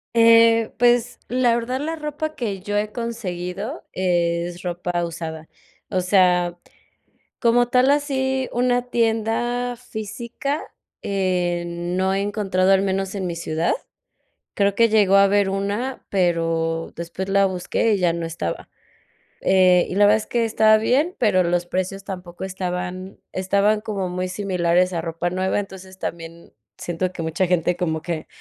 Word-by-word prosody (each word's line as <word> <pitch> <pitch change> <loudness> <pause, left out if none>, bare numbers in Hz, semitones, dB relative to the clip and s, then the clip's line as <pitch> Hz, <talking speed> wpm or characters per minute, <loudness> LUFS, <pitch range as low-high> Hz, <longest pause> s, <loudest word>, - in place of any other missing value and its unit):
Eh, 230 0 +6
pues, 240 0 +2
la 245 -1 +2
verdad 250 +3 -2
la 325 +2 -2
ropa 305 0 -4
que 205 -6 -3
yo 205 +1 -2
he 210 0 -1
conseguido 210 - -5
es 175 -1 0
ropa 175 0 -2
usada. 160 -1 -7 0.4
O 185 -2 0
sea, 180 -2 +3 0.8
como 240 0 +3
tal 255 +2 +4
así, 265 -2 0
una 245 0 +2
tienda 240 +2 0
física, 235 +5 -5 0.4
eh, 180 -3 0
no 175 +2 -1
he 195 - 0
encontrado 195 -2 +1
al 195 0 +5
menos 195 0 -1
en 190 -2 -2
mi 170 - -3
ciudad. 165 0 -1 0.8
Creo 200 -1 +2
que 230 +1 +4
llegó 205 -3 +4
a 200 - +7
haber 200 -1 +3
una, 205 +7 -3
pero 165 -3 0
después 170 +3 -5
la 195 0 +3
busqué 190 +4 0
y 200 - +2
ya 175 -2 +2
no 170 -1 -3
estaba, 165 - -5 0.7
eh, 185 -2 +4
y 180 - -4
la 205 0 +5
verdad 210 +1 +5
es 215 - -6
que 235 -1 +1
estaba 215 -1 +4
bien, 280 +11 +1
pero 185 -6 +3
los 175 0 0
precios 185 +2 -3
tampoco 180 -2 -7
estaban 185 0 -5
estaban 200 +3 +2
como 200 -4 -3
muy 180 +1 -2
similares 180 -2 +1
a 165 - -1
ropa 165 +1 -2
nueva, 185 +2 0
entonces, 190 -1 -9
también 165 0 -7 0.2
siento 180 +1 -3
que 175 - -7
mucha 160 +4 0
gente 175 0 +1
como 160 -3 -2
que 160 -2 -4
190 Hz, 150 wpm, -22 LUFS, 175-225 Hz, 0.8 s, a